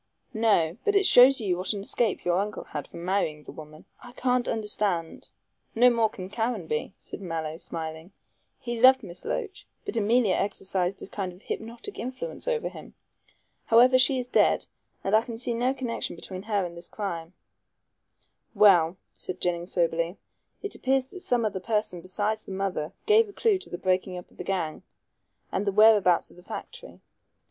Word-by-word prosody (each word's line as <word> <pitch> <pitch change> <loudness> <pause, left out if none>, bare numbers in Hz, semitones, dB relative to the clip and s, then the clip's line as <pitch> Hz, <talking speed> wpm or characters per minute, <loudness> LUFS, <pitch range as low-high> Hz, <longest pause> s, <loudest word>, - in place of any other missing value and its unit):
"No. 205 -6 +2
But 415 - +1
it 400 -1 +4
shows 260 -1 +7
you 190 -6 0
what 185 +3 0
an 200 - -4
escape 215 +1 -1
your 175 +1 +2
uncle 210 +1 -3
had 150 -2 -6
from 170 - -9
marrying 170 -6 -1
the - - -10
woman. 155 0 -12 0.2
I 245 - -12
can't 250 -1 0
understand 210 -6 -1 0.2
" - - -44
"No 245 +2 +6
more 230 -2 +2
can 185 -3 -7
Caranby," 205 -7 -2
said - - -8
Mallow, 160 -3 -4
smiling; 160 +1 -6 0.5
"he 240 -2 -4
loved 260 0 +7
Miss 175 -3 -9
Loach, 410 -3 -4 0.2
but - - -4
Emilia 225 -1 +3
exercised 190 -2 -1
a - - -7
kind 195 -2 -4
of 180 +3 -17
hypnotic 235 - -6
influence 260 - -5
over 475 -2 0
him. - - -10 0.7
However, 250 +3 +6
she 260 +1 +5
is 250 -1 -2
dead, - - +3 0.4
and 195 +2 +2
I 220 - +6
can 230 -1 -7
see 240 0 -1
no 245 +3 +1
connection 250 -8 -4
between 185 +2 -7
her 205 -2 -1
and 170 -1 -7
this 170 0 -6
crime." 175 -4 -5 1.2
"Well," 185 -4 +5 0.2
said 185 - -5
Jennings 175 0 -2
soberly, 170 +1 0 0.5
"it 410 - -4
appears 265 0 +1
that 370 - -10
some 245 -9 +1
other 200 -3 -2
person 210 -3 -1
besides 205 +4 -2
the 195 - -8
mother 190 -5 -2
gave 435 0 +5
a - - -12
clue 425 -3 +2
to - - -11
the 175 - -5
breaking 185 0 0
up 180 - -10
of - - -23
the - - -5
gang 175 -5 -2 0.7
and 195 - -1
the - - +3
whereabouts 210 -4 +5
of - - -19
the 180 - -15
factory. - - -9
205 Hz, 185 wpm, -27 LUFS, 180-245 Hz, 1.2 s, shows